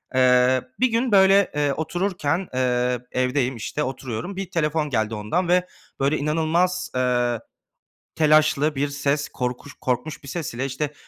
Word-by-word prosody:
Eee, 125 0 +4 0.2
bir 255 - +4
gün, 235 +1 +1
böyle, 195 0 +5
eee, 145 -1 +1
otururken, 175 +1 -1
eee, 125 -1 +1
evdeyim, 130 0 0
işte, 145 +6 -3
oturuyorum. 130 - -5
Bir 195 -2 -5
telefon 155 -3 0
geldi 110 -3 -1
ondan 135 - -1
ve, 180 +1 +2 0.3
böyle, 140 +3 +2
inanılmaz, 165 +4 0
eee, 120 -2 +1 0.8
telaşlı 155 -1 +3
bir 140 +2 0
ses, 140 +1 -1
korkuş 125 +3 -4
korkmuş 150 +4 -2
bir 140 - -11
ses 155 -3 -4
ile, 130 +3 -2
işte, 140 +2 -3
145 Hz, 145 wpm, -23 LUFS, 125-165 Hz, 0.8 s, böyle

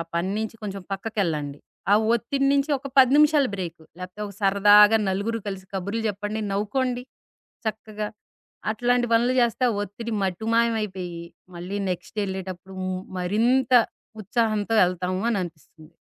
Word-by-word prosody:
పని 175 +3 0
నుంచి 220 +1 -4
కొంచెం 195 -2 -5
పక్కకెళ్ళండి. 170 -9 -2 0.3
ఆ - - +8 0.2
ఒత్తిడి 275 +4 0
నుంచి 280 +2 +1
ఒక 275 - -9
10 255 -1 +7
నిమిషాల 300 -2 +5
బ్రేక్ 175 -4 -5 0.2
లేకపోతే 185 +3 -8
ఒక 200 - -9
సరదాగా 205 +2 +6
నలుగురు 205 +4 -1
కలిసి 195 -1 -5
కబుర్లు 200 +4 -2
జెప్పండి. 210 +2 -3
నవ్వుకోండి 245 +5 -1 0.6
చక్కగా. 215 -1 -4 0.6
అట్లాంటి 245 +2 +1
పనులు 240 +2 +4
చేస్తే 240 +2 +1
ఆ - - -1
ఒత్తిడి 225 +4 -6
మటుమాయమైపోయి 200 -3 -1 0.3
మళ్ళీ 185 +4 -4
నెక్స్ట్ 180 +4 -5
ఎళ్ళేటప్పుడు 190 0 -6
హ్మ్ 185 0 -3 0.2
మరింత 235 +8 +2 0.5
ఉత్సాహంతో 220 0 0
ఎళ్తాము 185 +1 -2
అని 210 - +1
అనిపిస్తుంది. 160 -1 -11
205 Hz, 130 wpm, -24 LUFS, 185-230 Hz, 0.6 s, ఆ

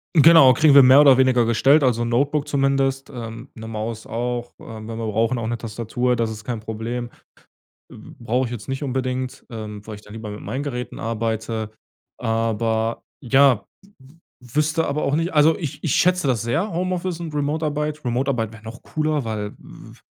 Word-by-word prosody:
Genau, 155 -4 +8
kriegen 150 +2 +4
wir 140 - +10
mehr 130 +2 +8
oder 140 -3 +7
weniger 130 -3 +3
gestellt, 135 +6 +4
also, 120 -2 +2
Notebook 140 +5 0
zumindest, 135 -1 0
ähm, 115 0 -8
'ne 110 0 -9
Maus 110 0 -5
auch, 120 +1 -3
äh, - - -12
wenn 110 -1 -9
wir 115 0 -5
brauchen, 115 +3 0
auch 110 - -3
'ne 120 +1 -2
Tastatur, 120 +2 -2
das 115 -1 -1
ist 105 -1 -8
kein 115 -2 -4
Problem 115 +2 -5 0.8
äh, - - -13 0.2
brauche 120 +2 0
ich 120 - -9
jetzt 110 -4 -7
nicht 135 +2 -3
unbedingt, 130 -1 -3
ähm, 105 -2 -8
weil 105 - -6
ich 105 - -13
dann 105 - -16
lieber 110 -1 -7
mit 105 - -8
meinen 125 +7 -4
Geräten 125 -3 -5
arbeite, 110 -1 -3 0.5
aber 115 0 -1 0.2
ja, 135 -2 +4 0.2
w 195 - -22 0.5
w 125 +2 -15
wüsste 155 +2 +1
aber 145 +2 -1
auch 140 - +1
nicht 165 +2 -1
also, 155 +1 +4
ich 150 -6 -6
ich 145 - +1
schätze 180 -4 +2
das 120 -4 +1
sehr, 165 - -1
Homeoffice 180 -1 -2
und 160 -2 -6
Remote-Arbeit 150 0 -2
Remote-Arbeit 120 -2 -1
wäre 110 -1 -14
noch 115 +2 -9
cooler, 155 -3 -1
weil 105 -2 -4
v - - -15
125 Hz, 190 wpm, -22 LUFS, 115-145 Hz, 0.8 s, wir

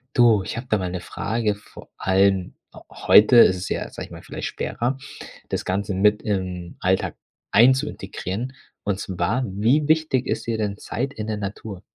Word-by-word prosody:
Du, 115 -4 +5
ich - - -5
habe 120 +2 -6
da 110 - +3
mal 90 -2 -3
'ne 90 -1 -4
Frage. 105 +2 -2
Vor 105 - -15
allem 95 -1 +2 0.4
heute 110 +4 +5
ist 95 -5 +7
es 90 - -5
ja, - - -3
sage - - -8
ich - - -22
mal, - - -9
vielleicht - - -5
schwerer, 125 +3 -2 0.5
das - - -3
Ganze 100 +2 -1
mit 105 +2 +3
im 90 -4 -3
Alltag 95 +1 0 0.4
ein 120 +5 +7
zu 130 - -2
integrieren. 115 +8 -5 0.3
Und 100 -1 -1
zwar: 100 +7 -1
Wie 115 +10 +1
wichtig 155 -5 +2
ist - - -2
dir 115 -1 0
denn 105 -2 -2
Zeit 130 +5 -4
in 105 0 -5
der 110 -1 -2
Natur? 100 -1 -6
105 Hz, 185 wpm, -23 LUFS, 95-120 Hz, 0.5 s, ist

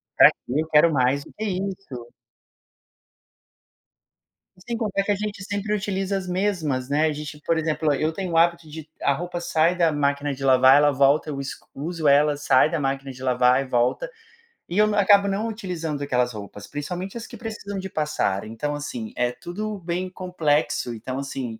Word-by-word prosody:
Pra - - +9 0.2
quê 135 +5 0
eu 160 - -5
quero 155 +1 +5
mais 135 +1 +2
do - - -16
que 215 - -6
isso. 185 - -4 2.5
E 180 - -21
sem 235 -1 -3
contar 205 -3 -1
que 205 - 0
a - - +2
gente 205 -1 -5
sempre 205 +1 -2
utiliza 195 -1 -1
as 185 -1 -5
mesmas, 175 -9 -1
né, 150 +2 +2
a - - 0
gente, 150 0 -7
por 165 - +2
exemplo, 155 -1 0
eu 155 +3 0
tenho 185 0 -4
o - - +2
hábito 170 0 +3
de, 155 0 -9
a 140 - +3
roupa 175 +3 -4
sai 165 +1 +2
da 165 -2 +3
máquina 145 0 0
de 135 0 -8
lavar, 130 +1 +6
ela 145 0 +5
volta, 140 +3 +3
eu 140 -2 -4
es 135 -1 -4 0.2
uso 160 +2 -2
ela, 145 +1 +4
sai 145 0 +4
da 165 - -1
máquina 135 -1 -2
de 130 0 -12
lavar 125 0 +3
e 135 - -6
volta. 125 - 0 0.6
E 175 - -4
eu 215 - +6
n 210 - 0
acabo 200 0 +5
não 200 +3 -1
utilizando 175 -9 -4
aquelas 125 -3 0
roupas, 105 -1 -9
principalmente 180 +7 -5
as 230 - -7
que 235 - -10
precisam 215 -3 -6
de 190 - -4
passar. 150 - -1
Então, 115 +7 -4
assim, 125 -6 -6
é 125 0 +1
tudo 210 +9 -5
bem 180 +1 -3
complexo, 160 -9 -1
então 130 +4 -5
assim 130 -5 -5
155 Hz, 195 wpm, -24 LUFS, 135-190 Hz, 2.5 s, Pra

